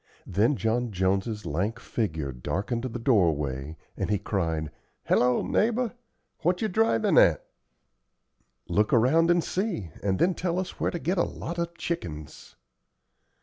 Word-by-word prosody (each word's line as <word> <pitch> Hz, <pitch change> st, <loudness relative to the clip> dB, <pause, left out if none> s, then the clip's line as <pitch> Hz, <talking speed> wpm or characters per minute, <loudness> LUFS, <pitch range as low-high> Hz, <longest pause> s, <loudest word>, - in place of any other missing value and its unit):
Then 105 Hz, +10 st, +2 dB
John 120 Hz, 0 st, 0 dB
Jones's 95 Hz, +3 st, 0 dB
lank 95 Hz, +9 st, -1 dB
figure 80 Hz, -, -2 dB
darkened 100 Hz, -, -3 dB
the 120 Hz, -1 st, -4 dB
doorway, 80 Hz, -, +1 dB, 0.2 s
and -, -, -2 dB
he 105 Hz, -, +2 dB
cried, 80 Hz, -7 st, -2 dB, 0.3 s
"Hello, 125 Hz, 0 st, +3 dB
neighbor, 235 Hz, +1 st, +1 dB, 0.5 s
what 180 Hz, +2 st, +1 dB
ye 220 Hz, -, 0 dB
drivin' 215 Hz, -, +3 dB
at?" -, -, +4 dB, 1.2 s
"Look 105 Hz, +1 st, +1 dB
around 150 Hz, +9 st, +4 dB
and 175 Hz, -1 st, +4 dB
see, 180 Hz, -, -2 dB
and 95 Hz, -2 st, 0 dB
then 180 Hz, -, +3 dB
tell 175 Hz, 0 st, -2 dB
us 185 Hz, -1 st, -4 dB
where -, -, +1 dB
to -, -, -3 dB
get 175 Hz, +3 st, -1 dB
a -, -, +4 dB
lot 170 Hz, +1 st, -5 dB
of 170 Hz, 0 st, -3 dB
chickens." 75 Hz, -, -5 dB
115 Hz, 145 wpm, -27 LUFS, -, 1.2 s, at